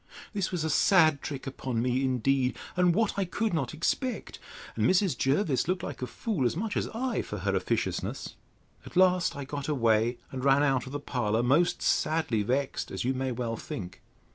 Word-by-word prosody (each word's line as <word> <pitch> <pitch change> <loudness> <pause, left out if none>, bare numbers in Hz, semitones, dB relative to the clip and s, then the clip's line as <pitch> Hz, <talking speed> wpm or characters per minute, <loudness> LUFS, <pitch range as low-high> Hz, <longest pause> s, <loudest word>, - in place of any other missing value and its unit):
This 200 -3 -1
was 175 -4 -1
a 160 - 0
sad 155 -5 +4
trick 140 -3 -5
upon 130 -3 -3
me, 125 +2 +1
indeed, 130 -1 +1 0.2
and 180 -2 +3
what 220 -2 +1
I - - +2
could 205 +4 -1
not 140 -7 -1
expect; 235 - -2 0.4
and - - +2
Mrs. 185 -5 +3
Jervis 135 - +1
looked 185 0 -1
like 145 - -6
a 125 - -2
fool 180 - -2
as 140 - -3
much 215 +3 -2
as - - 0
I, 255 +3 -1
for - - -6
her - - -1
officiousness.—At - - -4
last 185 -1 +4
I 140 - -5
got 140 0 -5
away, 115 -4 +2
and 130 -1 -5
ran 140 +1 +4
out 135 -3 +1
of - - -7
the 145 - -3
parlour, 120 -5 0
most 150 +8 +2
sadly 155 -9 +1
vexed, 130 +6 -1
as - - -4
you 130 +2 +1
may 130 0 -2
well 115 -1 -2
think. 90 -4 -7
140 Hz, 190 wpm, -28 LUFS, 125-175 Hz, 0.4 s, sad